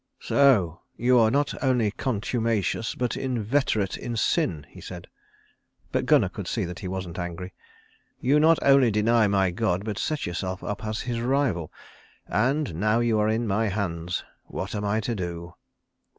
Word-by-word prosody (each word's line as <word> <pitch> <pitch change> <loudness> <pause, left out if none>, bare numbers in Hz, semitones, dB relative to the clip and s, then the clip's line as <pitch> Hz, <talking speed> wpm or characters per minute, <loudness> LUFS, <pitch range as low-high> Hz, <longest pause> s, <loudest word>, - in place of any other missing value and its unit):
"So 105 - +3 0.2
you 125 +1 +4
are 110 -1 +5
not 140 +4 +1
only 125 -6 +2
contumacious, 115 -1 -1
but 125 -2 -1
inveterate 120 -4 0
in 120 -1 -4
sin," 90 - 0
he - - -14
said; - - -8 0.9
but - - -1
Gunnar - - +4
could - - -7
see - - -1
that 90 +1 -7
he 95 - -5
wasn't 90 -2 -5
angry. 90 +1 -5 0.7
"You 140 +4 +3
not 160 +1 +5
only 135 -3 +6
deny 110 +1 +3
my 95 -2 +2
God, 95 -1 -1
but 105 -3 -3
set 155 -3 -1
yourself 95 +2 -4
up 105 +2 -4
as 110 0 -3
His 120 -1 -3
rival. 120 - 0 0.5
And 130 - 0
now 105 +7 +1
you 115 -2 +2
are 105 0 +2
in 115 +2 0
my 110 +2 +1
hands, 90 -4 -2 0.2
what 95 +4 -5
am 105 -1 -3
I 105 +2 0
to 120 +3 -2
do?" 85 -3 -5
110 Hz, 165 wpm, -26 LUFS, 95-120 Hz, 0.9 s, only